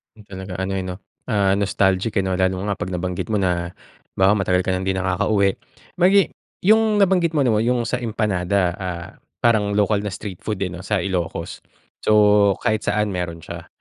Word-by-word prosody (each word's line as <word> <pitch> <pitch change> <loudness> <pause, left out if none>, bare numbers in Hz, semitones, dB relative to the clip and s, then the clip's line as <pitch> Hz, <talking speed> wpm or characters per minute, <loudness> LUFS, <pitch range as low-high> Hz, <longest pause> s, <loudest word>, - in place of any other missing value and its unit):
Talaga 95 -3 -9
ano, 95 +1 -2
eh, 95 - -2
'no, 90 -1 -5 0.3
ah, 100 -5 +2
nostalgic, 100 +1 +1
eh, - - -4
'no? 95 -1 -1
Lalo 95 0 0
nga 100 -1 -1
'pag 90 - -3
nabanggit 90 0 -3
mo 110 - 0
na, 90 -2 -1 0.4
'bawa 95 +1 +4
matagal 90 0 +1
ka 95 - -1
ng 95 0 -2
'di 95 - +2
nakakauwi. 95 +2 +1 0.5
Magi 190 +2 +4 0.3
yung 220 +1 +4
nabanggit 180 -5 +2
mo 140 - +3
na 120 - +3
yung 120 0 +1
sa 125 +2 -2
empanada, 100 -5 0
ah, 85 -2 -4 0.4
parang 105 -4 +2
local 105 0 +2
na 105 - -3
street 95 -2 -7
food, 105 -2 -3
eh, 90 - -3
'no, 90 +1 -8
sa 100 -3 0
Ilocos. 85 -3 -3 0.4
So, 105 -1 +4
kahit 110 0 0
saan 105 0 0
meron 85 -2 -4
siya. - - -8
100 Hz, 185 wpm, -21 LUFS, 95-110 Hz, 0.5 s, bawa